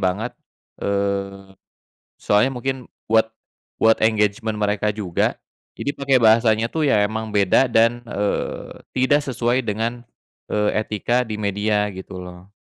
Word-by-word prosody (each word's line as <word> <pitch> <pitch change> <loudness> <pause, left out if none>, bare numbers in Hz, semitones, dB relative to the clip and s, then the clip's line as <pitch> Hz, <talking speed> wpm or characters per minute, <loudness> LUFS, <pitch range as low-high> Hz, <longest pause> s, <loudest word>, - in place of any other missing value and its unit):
banget. 100 +6 -1 0.5
Eee, 100 -1 -2 0.7
soalnya 105 +6 +3
mungkin 130 -1 -4 0.2
buat 110 0 +3 0.5
buat 115 0 +3
engagement 110 0 +1
mereka 105 0 0
juga. 100 -5 -1 0.4
Jadi 140 - -2
pakai 135 -2 +2
bahasanya, 110 0 +4
tuh, 160 +7 -3
ya, 110 - +4
emang 110 0 -4
beda 105 +5 +3
dan, 115 +1 +3
eee, 105 0 -2 0.2
tidak 145 +3 +2
sesuai 125 -1 0
dengan, 115 +2 -3 0.5
eee, 105 0 +1
etika 120 +4 0
di 110 -3 -5
media, 105 0 0
gitu, 95 0 -8
loh. 90 +2 -11
110 Hz, 130 wpm, -21 LUFS, 100-120 Hz, 0.7 s, bahasanya